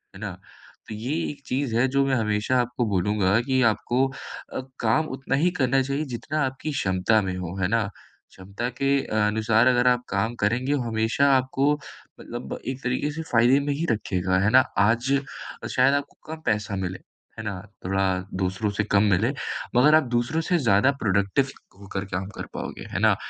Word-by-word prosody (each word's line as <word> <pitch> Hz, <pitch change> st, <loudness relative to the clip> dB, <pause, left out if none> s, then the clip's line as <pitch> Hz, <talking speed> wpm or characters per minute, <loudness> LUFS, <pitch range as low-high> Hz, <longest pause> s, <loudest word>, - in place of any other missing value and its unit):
है -, -, -10 dB
ना? -, -, -3 dB, 0.6 s
तो 110 Hz, -, -6 dB
ये 120 Hz, +7 st, -3 dB, 0.2 s
एक 145 Hz, -, -13 dB
चीज़ 130 Hz, -3 st, -1 dB
है, 125 Hz, +3 st, +4 dB
जो 135 Hz, +1 st, +2 dB
मैं 135 Hz, -1 st, +1 dB
हमेशा 110 Hz, +2 st, +1 dB
आपको 120 Hz, 0 st, -2 dB
बोलूँगा 100 Hz, +1 st, +2 dB
कि 130 Hz, +1 st, +1 dB
आपको 120 Hz, +3 st, +2 dB, 0.5 s
अ, -, -, -2 dB, 0.2 s
काम 125 Hz, +8 st, +2 dB
उतना 135 Hz, 0 st, -1 dB
ही 160 Hz, +6 st, +3 dB
करना 135 Hz, 0 st, +2 dB
चाहिए, 140 Hz, +3 st, -2 dB
जितना 145 Hz, +4 st, -3 dB
आपकी 135 Hz, +4 st, -4 dB
क्षमता 100 Hz, -3 st, +2 dB
में 95 Hz, -2 st, -3 dB
हो, 90 Hz, 0 st, -5 dB
है 90 Hz, -, +2 dB
ना? 115 Hz, +2 st, +1 dB, 0.5 s
क्षमता 100 Hz, +6 st, -5 dB
के 135 Hz, -, +2 dB, 0.3 s
अनुसार 110 Hz, +2 st, +3 dB
अगर 125 Hz, 0 st, +4 dB
आप 125 Hz, 0 st, +3 dB
काम 110 Hz, +4 st, -1 dB
करेंगे, 125 Hz, +7 st, +1 dB
हमेशा 115 Hz, +4 st, +1 dB
आपको 135 Hz, +2 st, +1 dB, 0.5 s
मतलब -, -, -6 dB
एक 130 Hz, +2 st, -4 dB
तरीके 125 Hz, +4 st, -1 dB
से 160 Hz, +2 st, -5 dB
फ़ायदे 120 Hz, +3 st, +5 dB
में 145 Hz, 0 st, -1 dB
ही 155 Hz, +4 st, -2 dB
रखेगा, 95 Hz, -4 st, 0 dB
है 100 Hz, +2 st, +3 dB
ना? 130 Hz, -, +8 dB, 0.2 s
आज 115 Hz, +5 st, +2 dB, 0.5 s
अ, -, -, -3 dB
शायद 130 Hz, +2 st, +3 dB
आपको 145 Hz, 0 st, -4 dB, 0.2 s
कम 160 Hz, -, -9 dB
पैसा 105 Hz, -2 st, 0 dB
मिले। 95 Hz, -1 st, -3 dB, 0.4 s
है 110 Hz, -, -6 dB
ना? 100 Hz, -3 st, -4 dB, 0.2 s
थोड़ा 95 Hz, +1 st, +1 dB, 0.4 s
दूसरों 95 Hz, +3 st, -1 dB
से 105 Hz, -, +2 dB
कम 100 Hz, 0 st, +3 dB
मिले, 100 Hz, +6 st, +2 dB, 0.5 s
मगर 145 Hz, +6 st, +6 dB
आप 155 Hz, -, +5 dB
दूसरों 120 Hz, +7 st, 0 dB
से 180 Hz, -, +3 dB
ज़्यादा 115 Hz, 0 st, +4 dB
प्रोडक्टिव 100 Hz, +6 st, +1 dB, 0.3 s
होकर 100 Hz, 0 st, -5 dB
काम 95 Hz, +1 st, -2 dB
कर -, -, -5 dB
पाओगे, -, -, -6 dB
है -, -, -2 dB
ना? -, -, +4 dB
120 Hz, 185 wpm, -25 LUFS, 100-135 Hz, 0.6 s, ना